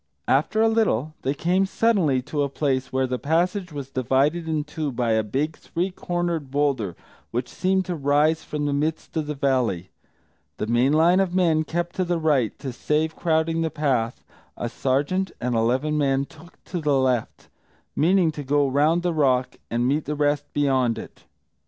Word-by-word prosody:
After 155 Hz, +11 st, +2 dB
a -, -, +5 dB
little 185 Hz, -, +1 dB
they 135 Hz, +2 st, -1 dB
came 180 Hz, +5 st, +1 dB
suddenly 185 Hz, -, +2 dB
to 145 Hz, +3 st, -2 dB
a 140 Hz, -, 0 dB
place 135 Hz, -2 st, -1 dB
where 130 Hz, 0 st, +1 dB
the 125 Hz, -1 st, -3 dB
passage 175 Hz, +4 st, 0 dB
was 140 Hz, -2 st, -7 dB
divided 135 Hz, +7 st, +1 dB
in 155 Hz, -2 st, 0 dB
two 150 Hz, -1 st, -4 dB
by 120 Hz, -2 st, 0 dB
a 110 Hz, 0 st, +3 dB
big 140 Hz, +9 st, -2 dB
three 180 Hz, +3 st, -3 dB
cornered 175 Hz, -5 st, -2 dB
boulder 135 Hz, -, 0 dB, 0.3 s
which 120 Hz, +2 st, -2 dB
seemed 190 Hz, 0 st, 0 dB
to 180 Hz, -, -3 dB
rise 150 Hz, +2 st, +2 dB
from 150 Hz, -1 st, -3 dB
the 145 Hz, -, 0 dB
midst 155 Hz, +4 st, -2 dB
of 155 Hz, -2 st, -1 dB
the 150 Hz, -, -3 dB
valley. 125 Hz, -10 st, 0 dB, 0.7 s
The -, -, -2 dB
main 120 Hz, +4 st, +2 dB
line 165 Hz, +4 st, +4 dB
of 185 Hz, -2 st, 0 dB
men 165 Hz, -4 st, +3 dB
kept 175 Hz, +2 st, -3 dB
to 185 Hz, -, +2 dB
the 175 Hz, -1 st, 0 dB
right; 145 Hz, -8 st, +1 dB
to 130 Hz, -3 st, -6 dB
save 155 Hz, +5 st, 0 dB
crowding 165 Hz, 0 st, +1 dB
the 165 Hz, -, 0 dB
path, 130 Hz, -7 st, -1 dB, 0.3 s
a 120 Hz, -, -3 dB
sergeant 145 Hz, +10 st, 0 dB
and 125 Hz, 0 st, -1 dB
eleven 130 Hz, +7 st, +1 dB
men 135 Hz, -1 st, +1 dB
took 165 Hz, +4 st, -17 dB
the 150 Hz, -6 st, 0 dB
left, 125 Hz, -3 st, -1 dB, 0.5 s
meaning 175 Hz, +1 st, +3 dB
to 150 Hz, -1 st, -6 dB
go 145 Hz, +1 st, +2 dB
round 150 Hz, +6 st, +2 dB
the 175 Hz, -1 st, 0 dB
rock 130 Hz, -5 st, +1 dB
and 120 Hz, +1 st, 0 dB
meet 145 Hz, +3 st, 0 dB
the 150 Hz, -, -2 dB
rest 145 Hz, 0 st, 0 dB
beyond 130 Hz, -5 st, +1 dB
it. -, -, -10 dB
150 Hz, 185 wpm, -24 LUFS, 130-165 Hz, 0.7 s, a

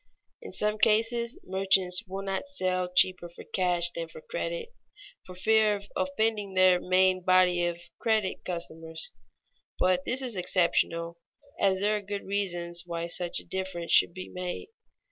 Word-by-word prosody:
_ -, -, -46 dB, 0.4 s
In 460 Hz, -, -9 dB
some 210 Hz, 0 st, 0 dB
cases 230 Hz, +2 st, +2 dB
merchants 190 Hz, +1 st, +2 dB
will 195 Hz, +1 st, -5 dB
not 195 Hz, +7 st, -3 dB
sell 185 Hz, -8 st, -1 dB
cheaper 185 Hz, -1 st, +3 dB
for 170 Hz, -, -12 dB
cash 175 Hz, -2 st, +1 dB
than 165 Hz, -1 st, -5 dB
for -, -, -12 dB
credit, -, -, -4 dB, 0.6 s
for 185 Hz, -, -10 dB
fear 215 Hz, +2 st, +3 dB
of 200 Hz, 0 st, -8 dB
offending 200 Hz, +1 st, -1 dB
their 185 Hz, -1 st, +5 dB
main 185 Hz, 0 st, +3 dB
body 180 Hz, -1 st, +4 dB
of 170 Hz, 0 st, -4 dB, 0.2 s
credit 220 Hz, -4 st, 0 dB
customers; 165 Hz, -2 st, -5 dB, 0.7 s
but 185 Hz, 0 st, +2 dB
this 260 Hz, +6 st, -1 dB
is 245 Hz, -4 st, -3 dB
exceptional, 170 Hz, -2 st, +1 dB, 0.4 s
as 190 Hz, -1 st, +2 dB
there 210 Hz, +1 st, +2 dB
are -, -, -5 dB
good 200 Hz, 0 st, -5 dB
reasons 175 Hz, -4 st, -2 dB
why 170 Hz, -1 st, -4 dB
such 170 Hz, 0 st, -1 dB
a -, -, -7 dB
difference 185 Hz, -2 st, -4 dB
should 170 Hz, -, +5 dB
be 185 Hz, -, -6 dB
made. 180 Hz, -, -6 dB
185 Hz, 160 wpm, -28 LUFS, 175-205 Hz, 0.7 s, their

